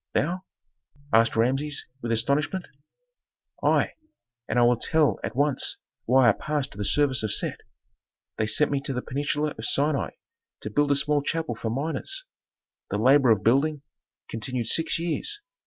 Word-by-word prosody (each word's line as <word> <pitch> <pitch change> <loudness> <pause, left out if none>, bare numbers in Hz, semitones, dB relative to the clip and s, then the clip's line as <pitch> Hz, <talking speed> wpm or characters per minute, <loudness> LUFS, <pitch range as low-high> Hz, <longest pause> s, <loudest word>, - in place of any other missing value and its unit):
"Thou?" 175 +5 0 0.7
asked 115 +1 +4
Rameses, 135 +6 0 0.2
with 115 - -3
astonishment. 145 - 0 1.0
"I, - - +2 0.6
and - - -1
I 120 - +5
will 120 +1 +4
tell 155 +4 +1
at - - -4
once 145 0 +1 0.3
why 130 +1 +5
I - - +7
passed 150 +4 -3
to 100 - -12
the - - -1
service 135 +1 +2
of 110 -2 -2
Set. - - -1 0.8
They 110 - 0
sent 145 +7 +3
me 140 - +1
to 140 - -3
the 125 - -3
peninsula 145 +2 -2
of - - -6
Sinai 140 +3 0 0.5
to 105 - -5
build 145 +6 +1
a 140 - +4
small 145 +1 +2
chapel 160 -1 -2
for 115 0 -4
miners. 160 - -2 0.6
The - - -1
labor 130 +3 +5
of 105 -3 +3
building 140 +5 +2 0.4
continued 120 +2 -3
six 160 +8 +3
years. 170 - -2
140 Hz, 160 wpm, -25 LUFS, 120-150 Hz, 1.0 s, I